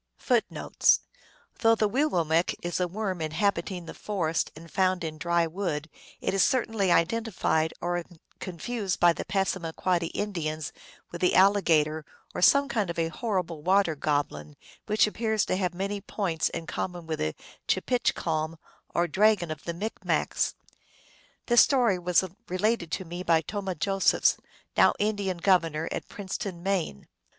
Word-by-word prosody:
1 245 -4 +5
) - - -50
1 - - -7 0.9
Though 225 -1 +5
the 215 -1 +2
Weewillmekq 180 - +1
is 175 +1 -2
a 180 - +1
worm 190 -1 -3
inhabiting 170 +2 -1
the - - -8
forest 170 -6 -1
and 165 +1 -12
found 185 -1 +1
in 155 -1 -5
dry 170 -1 +2
wood, 165 -3 -3 0.3
it - - -1
is 195 - +3
certainly 225 -7 +2
identified, 170 -4 +1
or 175 0 -1 0.4
confused, 190 +3 -3
by 175 -1 +6
the - - -5
Passamaquoddy 180 -2 0
Indians 160 -7 -3 0.4
with 170 - -7
the 180 - +3
alligator, 165 -6 +4 0.3
or - - -4
some 280 +8 +6
kind 220 -7 -1
of 170 - -4
a 165 -1 0
horrible 180 -4 -2
water 185 0 +3
goblin, 140 - -2 0.3
which 215 +1 +4
appears 220 0 0
to - - 0
have 180 -2 -1
many 200 +2 -3
points 185 -5 -1
in 165 - -5
common 175 0 -4
with 160 -1 -3
the 75 0 -1 0.3
Chepitchcalm, 165 -10 0 0.4
or 175 +1 +2
dragon 195 -3 +3
of 155 -2 -7
the 170 - -2
Micmacs. 215 +6 -1 0.9
This 240 -1 +6
story 240 -9 +3
was 180 +1 +2 0.2
related 185 -1 0
to 190 - -2
me 175 +2 -6
by 165 -3 +3
Tomah 195 0 -4
Josephs, 195 +5 +2 0.4
now - - +5
Indian 205 -3 -1
governor 165 -3 +2
at - - -4
Princeton, 190 -3 -5
Maine. 185 - -2
180 Hz, 150 wpm, -27 LUFS, 165-205 Hz, 0.9 s, by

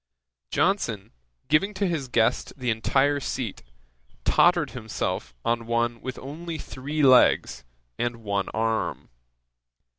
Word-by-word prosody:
Johnson 115 - 0 0.4
giving 195 +7 +2
to 200 +1 0
his 160 -7 -1
guest 120 0 +1
the 125 -3 0
entire 135 +6 +2
seat, 125 - -4 0.6
tottered 175 -3 +4
himself 110 - -4
on 115 -1 0
one 120 0 0
with 130 - -5
only 160 +5 -6
three 150 +2 -4
legs 125 - +5 0.4
and 120 -1 -2
one 100 -2 -1
arm. 110 0 -2
125 Hz, 115 wpm, -25 LUFS, 115-150 Hz, 0.6 s, legs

